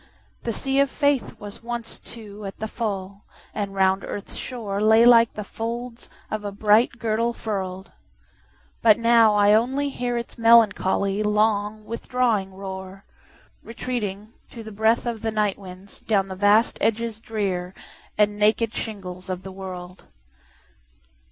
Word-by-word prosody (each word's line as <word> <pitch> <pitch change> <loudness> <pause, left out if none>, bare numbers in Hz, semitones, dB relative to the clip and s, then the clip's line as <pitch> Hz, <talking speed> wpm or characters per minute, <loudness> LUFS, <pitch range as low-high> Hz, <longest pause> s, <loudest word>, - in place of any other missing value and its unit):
The 235 - -2
sea 270 +5 -1
of 280 -1 +3
faithWas 265 -8 -1
once, 235 -1 -5
too, 215 -2 -11
at 195 - -8
the 220 - -4
full, 200 -3 -4 0.3
and 200 -2 -4
round 190 0 +2
earth's 205 - -7
shoreLay 220 -1 +2
like 230 -1 +7
the 210 - -4
folds 235 +3 -6 0.2
of 215 -1 -3
a 205 - -4
bright 215 +4 +3
girdle 230 0 0
furl'd. 190 -4 -5 0.9
But 220 -2 +6
now 230 -2 +5
I 205 0 +5
only 265 +6 +1
hearIts 240 -2 -4
melancholy, 210 -3 +4
long, 210 0 +1
withdrawing 230 -4 -1
roar, 190 0 -8 0.6
Retreating, 220 -3 -5 0.2
to 230 - -9
the 220 - -9
breathOf 220 +2 +1
the 225 - -1
night 210 -2 0
winds, 190 0 -12
down 195 -3 0
the 190 - -5
vast 205 +4 +3
edges 225 0 0
drearAnd 190 -5 -3 0.5
naked 210 +2 +1
shingles 185 -4 -6
of 185 0 -4
the 190 - -8
world. 185 -1 -9
215 Hz, 130 wpm, -24 LUFS, 195-230 Hz, 0.9 s, like